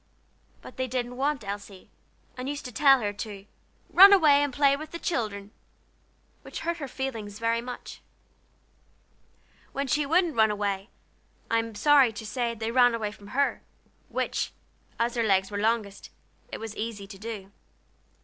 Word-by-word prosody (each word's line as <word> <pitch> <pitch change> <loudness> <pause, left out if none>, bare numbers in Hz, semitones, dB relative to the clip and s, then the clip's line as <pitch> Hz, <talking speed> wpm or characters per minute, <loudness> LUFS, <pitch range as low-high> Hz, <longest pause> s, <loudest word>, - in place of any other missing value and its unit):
But - - -12
they 260 0 -1
didn't 250 0 -3
want 275 -1 -1
Elsie, 200 -1 -7 0.4
and 255 +2 -5
used 290 0 -5
to 250 - -6
tell 270 +1 +5
her 205 -1 -2
to 205 -1 -7 0.5
"run 390 +3 +10
away 305 -7 +6
and 290 -1 0
play 280 +1 +3
with 310 +2 -8
the 335 - -6
children," 210 - -3 0.9
which - - -8
hurt 335 +1 -2
her 290 -4 -5
feelings 230 -6 -5
very 230 +1 0
much. 250 +1 -8 1.7
When 275 +1 -1
she 290 +2 0
wouldn't 340 +1 +2
run 220 -1 +5
away, 205 0 -2 0.6
I 230 - +4
am 225 -1 -5
sorry 280 0 +5
to 215 +1 -7
say 235 +2 -2
they 225 0 -3
ran 245 -1 +5
away 215 -2 -3
from 205 -1 -14
her, 275 +6 0 0.5
which, - - -2 0.4
as 235 +1 0
their 230 -2 0
legs 190 0 +2
were 205 - -3
longest, 215 -2 -1 0.4
it - - -5
was 225 -1 -7
easy 215 -2 -5
to 195 -1 -12
do. 210 -3 -7
230 Hz, 165 wpm, -27 LUFS, 210-275 Hz, 1.7 s, run